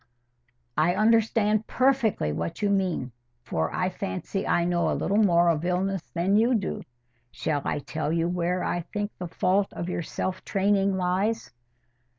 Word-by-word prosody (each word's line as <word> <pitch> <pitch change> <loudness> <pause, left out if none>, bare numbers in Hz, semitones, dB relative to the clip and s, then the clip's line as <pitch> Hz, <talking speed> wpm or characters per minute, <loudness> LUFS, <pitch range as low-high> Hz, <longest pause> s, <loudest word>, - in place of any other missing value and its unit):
"I 170 +3 +3
understand 215 0 +3
perfectly 255 - +2
what 85 - -4
you 205 - +2
mean, 185 -10 0 0.3
for 80 -9 -1
I 185 0 0
fancy 195 +1 -4
I 170 - +2
know 175 0 +1
a - - 0
little 205 +3 +1
more 175 -3 +4
of 160 -1 +1
illness 185 +1 0
than 180 +4 +2
you 235 +3 +3
do. 200 -4 -2 0.5
Shall 145 +3 -2
I - - 0
tell 155 +1 -3
you 165 0 +1
where 180 +1 -1
I 175 - -1
think 205 +4 -4
the 180 - -4
fault 190 +4 +1
of 170 - -4
your 175 - -2
self 185 +3 -4
training 195 -1 +1
lies?" 190 +5 0
185 Hz, 160 wpm, -26 LUFS, 170-205 Hz, 0.5 s, more